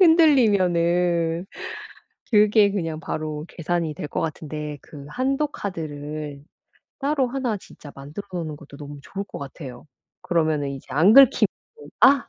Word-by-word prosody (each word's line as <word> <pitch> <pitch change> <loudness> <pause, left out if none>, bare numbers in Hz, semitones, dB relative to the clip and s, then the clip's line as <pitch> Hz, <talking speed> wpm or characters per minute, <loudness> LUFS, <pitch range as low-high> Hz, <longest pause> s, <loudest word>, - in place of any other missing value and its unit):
흔들리면은 180 - +4 0.9
그게 210 -1 +5
그냥 165 -5 -2
바로 155 -1 -4
계산이 170 -1 -2
될 150 - -5
것 - - -2
같은데 150 -1 -4
그 140 -2 -11
한도 270 - 0
카드를 150 - -6 0.6
따로 280 -1 +1
1 245 -3 -1
진짜 155 -6 -13
만들어 145 +9 -8
놓는 160 -4 -4
것도 145 -1 -13
너무 145 0 -9
좋을 195 +8 -5
것 - - -9
같아요. 135 -1 -9 0.4
그러면은 155 -4 +1
이제 135 -1 -8
안 160 +10 +5
긁히고 255 -5 +7 0.5
'아! 260 +2 +6
170 Hz, 270 characters per minute, -24 LUFS, 150-210 Hz, 0.9 s, 긁히고